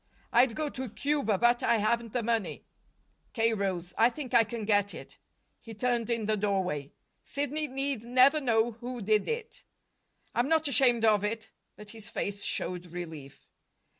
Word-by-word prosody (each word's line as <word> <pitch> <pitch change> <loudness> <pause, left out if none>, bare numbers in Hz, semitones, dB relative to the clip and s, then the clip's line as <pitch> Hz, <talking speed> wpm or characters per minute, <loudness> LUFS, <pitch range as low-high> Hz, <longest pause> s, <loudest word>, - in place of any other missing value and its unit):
"I'd 240 -1 +4
go 310 - -1
to 260 -3 -5
Cuba, 275 -4 0
but 240 +3 +3
I 235 - +3
haven't 230 +2 0
the 245 - 0
money." 225 -3 -2 0.7
K. 225 -1 +2
rose. 185 -4 -2
"I 230 +2 +6
think 255 0 -7
I 235 -1 +7
can 225 -1 -5
get 205 -1 +2
it." - - -11 0.4
He 225 -1 -11
turned 240 0 0
in 230 -2 -1
the 215 +1 +1
doorway. 190 -9 -1 0.3
"Sidney 290 +2 -2
need 270 -3 -2
never 255 +5 +5
know 235 -2 +2
who 240 +2 -7
did 215 +1 +2
it." 460 0 -5 0.7
"I'm 245 +4 +1
not 320 -1 +3
ashamed 245 -3 +3
of 210 -2 +4
it." 220 +1 -3 0.2
But 210 0 -11
his 225 -1 -10
face 200 -3 -4
showed 180 -1 -2
relief. 160 -5 -9
230 Hz, 165 wpm, -29 LUFS, 205-250 Hz, 0.7 s, I